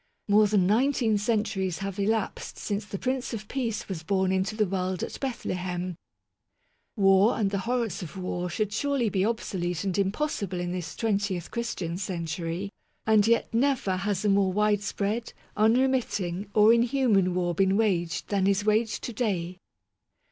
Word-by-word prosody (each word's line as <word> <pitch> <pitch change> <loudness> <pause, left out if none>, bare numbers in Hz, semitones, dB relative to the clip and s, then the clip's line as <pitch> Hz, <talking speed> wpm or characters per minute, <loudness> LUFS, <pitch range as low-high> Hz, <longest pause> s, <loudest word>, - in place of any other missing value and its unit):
More 210 +1 +5
than 200 -3 +3
nineteen 225 0 +2
centuries 210 -4 0
have 195 0 -5
elapsed 215 +1 -1
since 205 -1 -3
the 200 - -5
Prince 255 +1 -2
of 210 -1 -8
Peace 235 -5 -3
was 185 -5 -4
born 190 +2 +1
into 190 +3 0
the 215 -1 +2
world 185 -1 -2
at - - -5
Bethlehem. 180 -8 -3 1.0
War 195 +1 +4
and 200 -3 +1
the 200 - -1
horrors 235 -4 -1
of 180 +2 -8
war 180 -1 -3
should 205 +4 -2
surely 275 -1 0
be 190 -2 0
obsolete 180 -6 -2
and 190 -3 -1
impossible 200 - -1
in 175 0 -2
this 175 -4 -5
twentieth 200 -5 -1
Christian 190 -8 -3
century; 170 +1 -3 0.3
and 215 -1 +4
yet 230 0 +2
never 235 -6 +1
has 195 +1 -1
a - - +4
more 195 -1 +3
widespread, 210 +2 0 0.2
unremitting, 215 -5 +1
or 215 +1 +7
inhuman 230 -6 +2
war 175 -1 0
been 190 +2 +2
waged 180 -6 0
than 195 -2 +1
is 200 +1 +1
waged 215 +1 +1
to 240 - -4
day. 185 -6 -2
200 Hz, 155 wpm, -27 LUFS, 185-220 Hz, 1.0 s, or